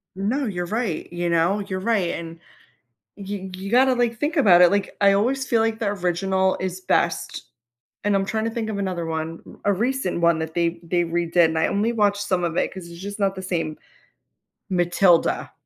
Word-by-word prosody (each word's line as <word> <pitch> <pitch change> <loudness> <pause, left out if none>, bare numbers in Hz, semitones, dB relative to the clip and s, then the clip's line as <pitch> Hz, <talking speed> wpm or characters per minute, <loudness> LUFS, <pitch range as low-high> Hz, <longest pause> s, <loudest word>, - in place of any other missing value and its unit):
No, 225 +9 -1
you're 175 -5 -3
right, 205 -4 -3
you 175 0 -2
know? 170 +4 +2
You're 190 -2 -4
right, 200 -3 +1
and 165 0 -7 0.8
you 195 -1 -6
you 195 +3 -7
gotta, 260 +2 +5
like, 240 -2 0
think 300 +4 -1
about 185 -11 +6
it, 180 0 +7
like, 200 -1 -1
I 200 -1 +6
always 260 +7 +1
feel 230 -3 +2
like 225 0 0
the 225 - -1
original 190 0 0
is 185 0 -4
best, - - 0 0.6
and 205 -1 +2
I'm 195 0 +1
trying 220 +3 -2
to 230 - -1
think 225 -1 -3
of 210 - -3
another 185 -4 -2
one, 160 0 -4 0.2
r 205 - +4
a - - +2
recent 225 -4 -1
one 170 -1 +3
that 160 0 -4
they 170 0 0
they 175 +1 0
redid, 170 0 +2
and 160 0 -1
I - - +2
only 215 +4 0
watched 205 -2 +1
some 185 -2 0
of 170 -1 -2
it, - - 0
'cause 185 -2 -9
it's 170 +1 -11
just 200 +2 -6
not 195 -1 +1
the 190 - -6
same, 165 -4 -3 0.9
Matilda. 175 -1 +2
190 Hz, 205 wpm, -23 LUFS, 175-210 Hz, 0.9 s, it